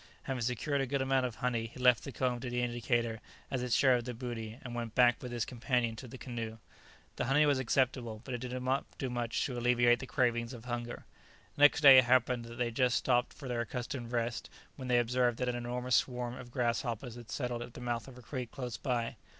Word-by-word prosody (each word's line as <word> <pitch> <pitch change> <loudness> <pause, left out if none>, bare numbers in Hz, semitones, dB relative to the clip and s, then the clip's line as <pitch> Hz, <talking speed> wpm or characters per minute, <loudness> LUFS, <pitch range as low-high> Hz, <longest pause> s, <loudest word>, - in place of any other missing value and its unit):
Having 130 -2 -3
secured 125 +4 0
a 135 - -1
good 140 +1 0
amount 130 -1 +2
of 120 - -8
honey, 115 -2 -1
he 120 - -13
left 125 -2 +5
the 140 - -5
comb 125 -2 -1
to 125 - -5
the 125 0 -1
indicator 120 -2 -1 0.3
as 130 - -1
its 125 -2 +1
share 130 -2 +5
of 120 -1 -2
the 125 -2 -5
booty, 115 -2 -5
and 120 - -6
went 115 -2 -4
back 120 -1 +5
with 125 - -6
his 120 -2 -1
companion 120 -1 0
to 130 - -8
the 130 - -9
canoe. 115 -3 -5 0.6
The - - 0
honey 140 +4 +4
was 145 -2 +3
acceptable, 125 -3 0
but 130 - -5
it 120 - -2
did 125 +1 -4
not 130 +2 0
do 130 -2 -3
much 120 -1 -1
to 125 -3 -3
alleviate 120 0 +4
the 130 - -7
cravings 120 -3 0
of 120 -1 -10
hunger. 120 -1 -5 0.5
Next 145 +2 +6
day 135 -3 +10
it 130 - +3
happened 125 -1 +2
that 115 0 -9
they 125 - +1
had - - -18
just 125 -2 +3
stopped 125 -1 +2
for 135 - -10
their 120 -1 -1
accustomed 120 0 -5
rest, 120 0 -2 0.3
when 130 -2 -7
they 125 -1 +3
observed 120 0 +2
that 125 -1 -1
an 125 - -1
enormous 125 +1 0
swarm 125 -1 -1
of 125 -1 -9
grasshoppers 120 0 -1
had 120 -2 -11
settled 125 -3 -3
at 120 0 -8
the - - -7
mouth 120 0 -2
of 130 -2 -12
a 125 - -12
creek 125 +1 -5
close 125 -2 -5
by. 120 -4 -2
125 Hz, 240 wpm, -32 LUFS, 120-130 Hz, 0.6 s, day